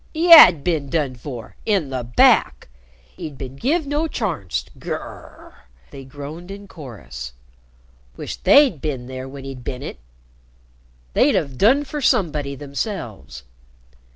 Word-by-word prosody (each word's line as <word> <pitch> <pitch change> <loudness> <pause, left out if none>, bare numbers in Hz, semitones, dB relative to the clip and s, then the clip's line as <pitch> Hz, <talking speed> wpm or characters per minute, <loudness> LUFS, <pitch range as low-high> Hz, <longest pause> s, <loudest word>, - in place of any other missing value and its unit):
He 340 +2 +1
had 180 - +10
"bin 155 -6 -1
'done 145 -5 -1
for' 120 -1 -9
in 190 -10 0
the 130 -2 -3
back! 115 - +3 0.5
'E'd 150 -3 -7
bin 130 -1 -8
give' 295 - 0
no 295 +3 -1
charnst. 145 - -3
G - - -9
r - - -1
r - - -9 0.3
r!" 65 - -19 0.3
they 135 - -10
groaned 145 +6 -9
in 200 +1 -9
chorus. 65 - -10 0.8
"Wisht" - - -7
they'd 275 - +5
"bin 135 -5 -4
there 130 +1 -7
when 135 0 -10
'e'd 135 -2 -8
bin 130 +2 -6
'it!" - - -7 1.1
They'd - - +3
"'ave 140 -4 -1
done 255 - +4
fur 290 +1 -6
somebody" 150 - 0
themselves. 135 - -6
140 Hz, 150 wpm, -21 LUFS, 125-195 Hz, 1.1 s, had